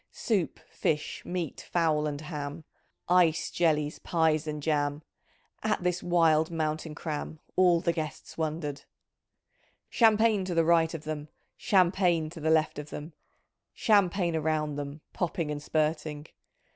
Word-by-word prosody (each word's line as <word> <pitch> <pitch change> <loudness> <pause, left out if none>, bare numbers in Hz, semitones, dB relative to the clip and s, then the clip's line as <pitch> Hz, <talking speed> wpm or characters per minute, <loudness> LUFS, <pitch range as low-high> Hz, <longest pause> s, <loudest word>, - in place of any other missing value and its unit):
Soup, 200 -8 -1
fish, 150 -1 -2
meat, 175 -4 -4
fowl, 155 -3 +2
and 145 0 -4
ham. 150 0 -6 0.4
Ice, 175 -3 +3
jellies, 150 -3 +1
pies, 160 -2 +1
and 150 -1 -4
jam; 145 -1 0 0.6
At 215 -4 0
this 180 0 0
wild 165 -3 +3
mountain 155 -1 -2
cram 155 0 -5 0.2
All 180 -2 +4
the 170 - +1
guests 155 -2 -5
wondered. 155 -3 -3 1.1
"Champagne 220 -3 +4
to 180 -2 -3
the 165 -1 +3
right 165 0 +3
of 155 - -7
them. 155 -1 -5 0.3
Champagne 175 -4 +2
to 165 - -9
the 160 +1 0
left 160 -2 +2
of 150 0 -8
them. 155 +2 -7 0.6
Champagne 190 -5 +2
around 155 -1 0
them. 145 +1 -6
Popping 170 -3 -2
and 145 0 -4
spurting. 155 -1 -1
160 Hz, 135 wpm, -29 LUFS, 150-175 Hz, 1.1 s, All